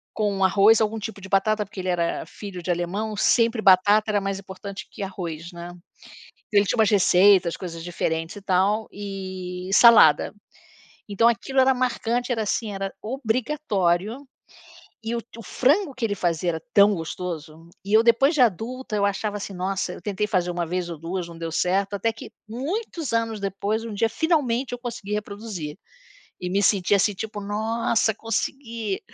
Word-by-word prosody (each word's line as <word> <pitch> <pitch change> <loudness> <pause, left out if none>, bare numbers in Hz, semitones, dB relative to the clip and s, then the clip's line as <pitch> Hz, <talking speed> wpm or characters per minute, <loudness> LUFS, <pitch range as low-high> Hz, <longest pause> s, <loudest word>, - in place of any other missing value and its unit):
com 205 -2 0
arroz, 200 +4 +5
algum 220 0 0
tipo 215 -1 -6
de 190 - -10
batata, 210 +2 +2
porque 200 -1 -9
ele 185 - -4
era 170 -2 -1
filho 190 -4 -8
de 180 - -4
alemão 195 +5 -2
sempre 230 +1 +2
batata 205 +3 +5
era 205 -1 +2
mais 195 0 -3
importante 195 +1 -8
que - - -8
arroz, 170 -3 -6
né. 170 0 -8 0.8
Então 205 - +4
ele 200 - 0
tinha 225 - -1
umas 220 -1 +4
receitas, 190 -2 +5
coisas 165 -3 -7
diferentes 165 +1 -3
e 205 - -9
tal 195 +4 +1
e 190 -2 -6
salada. 215 -9 +7 0.8
Então 210 +3 +3
aquilo 265 +4 +1
era 265 0 +4
marcante, 245 -1 -1
era, 225 -2 -1
assim, 210 +1 -2
era 195 0 -4
obrigatório, 225 - -1 0.8
e 230 +1 -2
o 235 - -2 0.2
frango 290 +4 +1
que 255 - -7
ele 210 - -1
fazia 175 -1 0
era 160 - -5
tão 205 0 +6
gostoso, 165 -2 -6 0.2
e 200 - -3
eu 220 - +6
depois 240 +6 +4
de 285 - +3
adulta 235 +2 0
eu 200 - +2
achava 205 +1 -1
assim: 200 0 -6
"Nossa!", 190 +1 -2
eu - - -10
tentei 210 0 -2
fazer 180 -4 0
1 175 -1 -2
vez 180 +1 -2
ou 170 - -6
2 175 +2 -4
não 170 -1 -11
deu 165 -1 -5
certo, 195 +4 0
até 225 +3 0
que 225 - -11 0.2
muitos 315 - -4
anos 225 -1 0
depois 200 +3 -2
um 225 - -6
dia 225 +2 +1
finalmente 265 -4 0
eu 245 - -5
consegui 230 -4 -6
reproduzir. 205 -7 -5 0.6
E 180 - -4
me 200 +2 +1
senti 200 -1 +3
assim 200 +1 +2
tipo: 210 +1 -6
"Nossa 220 +2 0
consegui". 225 -1 -3
205 Hz, 175 wpm, -24 LUFS, 185-225 Hz, 0.8 s, salada